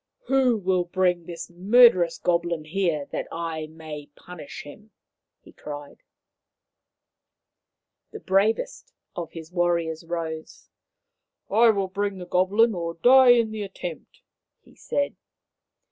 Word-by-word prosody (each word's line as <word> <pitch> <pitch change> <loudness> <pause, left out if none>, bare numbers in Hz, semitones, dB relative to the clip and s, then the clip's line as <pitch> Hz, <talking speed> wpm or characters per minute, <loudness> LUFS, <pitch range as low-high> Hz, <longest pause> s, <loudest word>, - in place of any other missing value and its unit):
" - - -61
Who 260 -3 +3
will 185 -2 0
bring 180 -1 0
this 170 -1 -7
murderous 185 -1 +5
goblin 170 -2 -1
here 165 -3 -1
that - - -4
I 165 -2 -4
may 155 -2 -9
punish 150 -7 -10
him 210 +9 -13 0.3
?" - - -62
he - - -16
cried. 145 -1 -9 2.1
The - - -9
bravest 215 - 0 0.2
of 170 -2 -6
his 160 0 -9
warriors 170 -2 0
rose. 165 -2 -6 0.4
" - - -60
I 230 +3 +5
will 200 -3 +1
bring 200 +1 -3
the 180 - -7
goblin 200 +6 +2
or 170 -2 -4
die 250 +5 +7
in 230 -2 +1
the 220 -1 -5
attempt," 185 -4 -8 0.4
he - - -21
said. 285 0 -2
180 Hz, 130 wpm, -25 LUFS, 165-205 Hz, 2.1 s, die